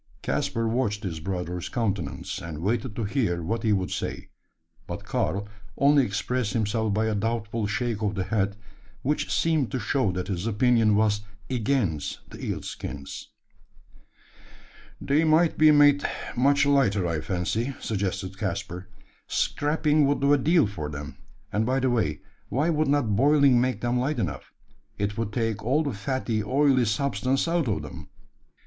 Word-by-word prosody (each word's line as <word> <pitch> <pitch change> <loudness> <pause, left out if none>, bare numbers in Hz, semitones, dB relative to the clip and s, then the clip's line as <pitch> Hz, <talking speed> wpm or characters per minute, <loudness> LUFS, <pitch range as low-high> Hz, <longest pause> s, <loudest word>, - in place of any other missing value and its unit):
Caspar 115 0 -1
watched 110 -3 -1
his 85 -5 -4
brother's 90 0 -4
countenance, 105 -7 -2
and 80 -2 -6
waited 110 +2 -1
to 115 - -2
hear 100 -6 0
what 115 +8 -2
he 110 - +1
would 95 -3 0
say; - - -4 0.6
but - - -6
Karl 100 +1 -1 0.3
only 140 0 +5
expressed 115 +1 -1
himself 110 0 0
by 110 +2 +1
a 110 - 0
doubtful 110 0 -1
shake 115 +1 -2
of 105 -1 0
the 95 - -1
head, 100 +1 0 0.5
which 150 +3 -1
seemed 160 -6 +2
to 130 - -2
show 115 -1 +1
that 90 0 -4
his 95 +1 -2
opinion 115 -1 +3
was 105 -1 +2 0.3
against 110 - -1
the - - -9
eel - - -3
skins. 70 -1 -7 1.7
"They 145 +3 +2
might 160 +1 +4
be 155 0 +7
made 145 -1 +6 0.3
much 140 +3 +3
lighter, 130 -10 +3
I 80 -3 -1
fancy," 95 - -2
suggested 95 -2 -3
Caspar: 90 +3 -4 0.4
"scraping 150 0 +1
would 145 0 +1
do 140 +1 +4
a - - +5
deal 160 +4 +4
for 85 -8 -5
them; 70 -1 -7 0.4
and 105 - +2
by 130 +4 +1
the 130 -1 +1
way, 110 -11 0 0.3
why 150 +6 +1
would 155 -1 +1
not 135 -7 +2
boiling 140 -1 +5
make 125 -4 -1
them 120 +1 +1
light 140 +4 -1
enough? 80 - -3 0.5
It 105 +1 -1
would 115 -1 -2
take 115 -3 -1
all 135 +7 +2
the 140 -4 -2
fatty, 110 +1 -2
oily 130 +1 +3
substance 130 +4 0
out 165 -4 +1
of 100 -9 -1
them." 75 - -9
115 Hz, 160 wpm, -26 LUFS, 100-135 Hz, 1.7 s, be